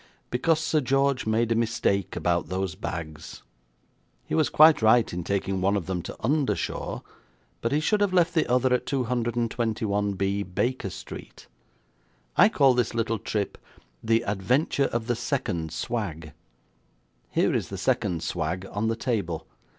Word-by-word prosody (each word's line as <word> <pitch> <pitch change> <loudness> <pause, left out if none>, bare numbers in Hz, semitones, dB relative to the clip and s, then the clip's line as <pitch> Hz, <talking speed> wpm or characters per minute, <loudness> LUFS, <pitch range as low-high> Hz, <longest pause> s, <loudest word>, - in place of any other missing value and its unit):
Because 155 +6 +2
Sir 155 -1 +1
George 135 -1 +1
made 115 +1 +1
a - - +3
mistake 110 -4 0
about 85 -1 0
those 95 -2 -2
bags. 80 -2 -7 0.8
He - - -6
was 155 -2 +3
quite 155 -2 +6
right 110 0 +4
in 90 0 -3
taking 95 0 -1
one 100 +2 +2
of 95 - -3
them 95 -2 -2
to - - -8
'Undershaw', 140 +4 -1 0.6
but 115 - -1
he 145 - +2
should 205 +7 +1
have 205 -2 +2
left 175 -2 +3
the 160 - +2
other 125 0 +3
at 125 - 0
221B, 115 -6 -1
Baker 125 -5 0
Street. - - -10 0.9
I 205 +5 +7
call 140 - +4
this 125 -1 0
little 115 -1 0
trip 105 -1 -3 0.4
'The 115 +1 +2
Adventure 125 - +1
of 120 -3 -2
the 120 0 0
Second 105 - -2
Swag'. 85 -9 -4 1.0
Here - - +1
is - - -1
the - - -5
second 85 -2 0
swag 90 +2 -2
on 105 +2 -1
the 115 - +1
table. 100 - -2
115 Hz, 150 wpm, -26 LUFS, 95-130 Hz, 1.0 s, I